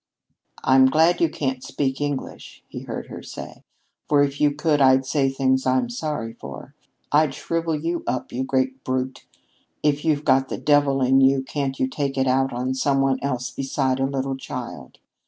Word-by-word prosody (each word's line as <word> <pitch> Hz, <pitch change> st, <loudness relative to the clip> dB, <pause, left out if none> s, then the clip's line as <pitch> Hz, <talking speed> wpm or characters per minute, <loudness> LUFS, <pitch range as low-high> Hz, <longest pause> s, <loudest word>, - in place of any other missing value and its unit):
"I'm 130 Hz, 0 st, +6 dB
glad 160 Hz, +5 st, +3 dB
you 165 Hz, -, +4 dB
can't 130 Hz, -4 st, -3 dB
speak 135 Hz, -1 st, -2 dB
English," 145 Hz, -2 st, -5 dB
he -, -, -7 dB
heard -, -, -5 dB
her -, -, -8 dB
say, -, -, -9 dB, 0.5 s
"for 145 Hz, -1 st, +5 dB
if 140 Hz, 0 st, -2 dB
you 145 Hz, -1 st, +4 dB
could 150 Hz, 0 st, +1 dB
I'd 130 Hz, 0 st, +5 dB
say 135 Hz, 0 st, +1 dB
things 130 Hz, -1 st, +1 dB
I'd 130 Hz, -1 st, +2 dB
be 120 Hz, -, -8 dB
sorry 135 Hz, -5 st, -3 dB
for. 70 Hz, -, -10 dB, 0.4 s
I'd 150 Hz, -2 st, +3 dB
shrivel 165 Hz, -1 st, -2 dB
you 165 Hz, +3 st, -2 dB
up, 130 Hz, -, -2 dB
you 130 Hz, +2 st, -2 dB
great 130 Hz, 0 st, -1 dB
brute. 130 Hz, 0 st, -3 dB, 0.6 s
If 145 Hz, -1 st, +1 dB
you've 150 Hz, -2 st, +1 dB
got 135 Hz, -1 st, +3 dB
the -, -, -3 dB
devil 145 Hz, -2 st, +3 dB
in 135 Hz, +1 st, +4 dB
you, 135 Hz, 0 st, +4 dB
can't 135 Hz, -1 st, -3 dB
you 130 Hz, -, +2 dB
take 140 Hz, 0 st, -3 dB
it 135 Hz, -, +2 dB
out 135 Hz, +1 st, +2 dB
on 125 Hz, +2 st, -2 dB
some 135 Hz, +1 st, +1 dB
one 135 Hz, -1 st, +1 dB
else 125 Hz, -2 st, -2 dB
beside 135 Hz, 0 st, -1 dB
a 135 Hz, -, +1 dB
little 135 Hz, 0 st, -2 dB
child? 135 Hz, -, -8 dB
135 Hz, 190 wpm, -23 LUFS, 130-145 Hz, 0.6 s, I'm